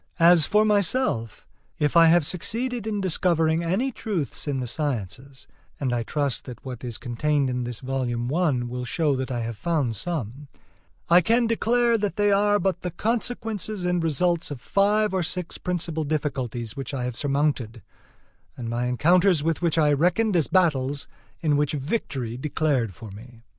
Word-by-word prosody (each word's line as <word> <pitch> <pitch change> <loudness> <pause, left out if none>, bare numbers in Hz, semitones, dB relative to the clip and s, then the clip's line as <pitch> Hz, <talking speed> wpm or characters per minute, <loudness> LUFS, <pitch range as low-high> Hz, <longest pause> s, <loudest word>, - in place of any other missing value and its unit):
As 170 -2 +6
for 210 +1 +3
myself, 205 - 0 0.3
if 150 +2 0
I 165 -1 +8
have 165 -1 +4
succeeded 230 - -2
in 210 -2 -1
discovering 165 -3 +1
any 200 +11 0
truths 185 - -3
in 140 -2 -1
the 125 - -2
sciences 130 - -4 0.3
(and 130 -3 -1
I 120 - 0
trust 140 +2 -2
that 125 0 -10
what 125 -2 -7
is 120 -3 -4
contained 140 +2 0
in 125 -1 -2
this 120 -2 -5
volume 130 -1 -2
I 175 0 +2
will 125 +1 -5
show 145 +2 0
that 130 0 -3
I 120 -2 -2
have 115 -1 -5
found 145 -6 0
some), 140 - -4 0.6
I 175 +1 +6
can 230 +6 +2
declare 230 +1 +2
that 205 -4 -2
they 205 0 +2
are 205 +1 +3
but 190 -2 -1
the 180 - -3
consequences 215 -1 -3
and 180 -1 +1
results 165 +2 +1
of 145 -4 -6
five 205 - +2
or 190 - +1
six 180 +1 -3
principal 170 -3 -2
difficulties 130 -7 -3
which 135 0 -5
I 125 - -3
have 125 -1 -3
surmounted, 140 -5 -1 0.7
and 115 -2 -5
my 120 +1 -1
encounters 170 +6 +3
with 165 +1 0
which 170 -2 +1
I 150 -2 +4
reckoned 180 +8 +2
as 165 -4 +3
battles 145 -6 +1 0.3
in 150 -4 +2
which 145 0 +1
victory 135 - -3
declared 135 - -1
for 110 +3 -10
me. 115 +3 -13
155 Hz, 175 wpm, -25 LUFS, 125-180 Hz, 0.7 s, I